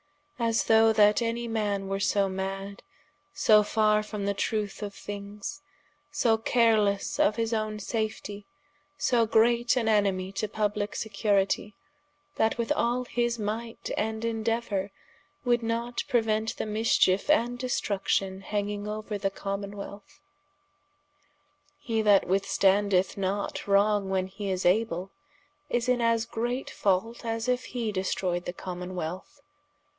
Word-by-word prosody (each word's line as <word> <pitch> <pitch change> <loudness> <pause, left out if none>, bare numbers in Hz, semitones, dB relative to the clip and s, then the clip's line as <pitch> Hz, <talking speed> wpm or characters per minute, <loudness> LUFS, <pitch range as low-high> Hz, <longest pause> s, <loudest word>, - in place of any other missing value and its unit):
As 230 -1 +2
though 225 0 +5
that 210 +1 +5
any 235 +1 -1
man 205 -3 -1
were 195 0 -2
so 200 0 +2
madde, 195 +1 -4 0.5
so 215 -1 +5
farre 215 0 +2
from 210 -1 -5
the 200 - +1
trueth 210 0 -2
of 205 -1 -5
things, 205 +6 -7 0.5
so 230 -6 +2
carelesse 220 -4 +2
of 210 - +4
his 230 0 -1
owne 215 -1 -1
safetie, 210 -1 -4 0.5
so 235 -3 +2
great 235 +2 +3
an 235 - +1
enemie 195 -3 +2
to 215 +2 -2
publike 210 0 -2
securitie, 205 -1 0 0.6
that 220 +1 +2
with 235 -1 -2
all 245 +2 +1
his 240 -1 -1
might 225 +2 -4
and 220 +1 -2
indeuour, 225 -3 -1 0.6
would 240 -1 +3
not 235 +1 -2
preuent 220 -3 0
the - - -2
mischiefe 215 -1 +2
and 245 -5 +2
destruction 195 -5 -1
hanging 205 0 -3
ouer 215 0 -4
the 195 - 0
Commonwealth. 200 +1 -6 1.6
He 225 -6 -1
that 205 -2 +5
withstandeth 195 0 +2
not 200 +1 -2
wrong 200 0 +3
when 190 -1 0
hee 195 +1 -6
is 185 -1 -2
able, 185 -1 +1 0.6
is 240 0 0
in 250 -1 +2
as 230 -1 +2
great 240 +3 -3
fault, 205 +5 0
as 225 0 -2
if 250 0 0
he 235 -3 -3
destroyed 185 -2 -1
the 175 - -4
Commonwealth. 180 - -6
210 Hz, 130 wpm, -28 LUFS, 200-230 Hz, 1.6 s, though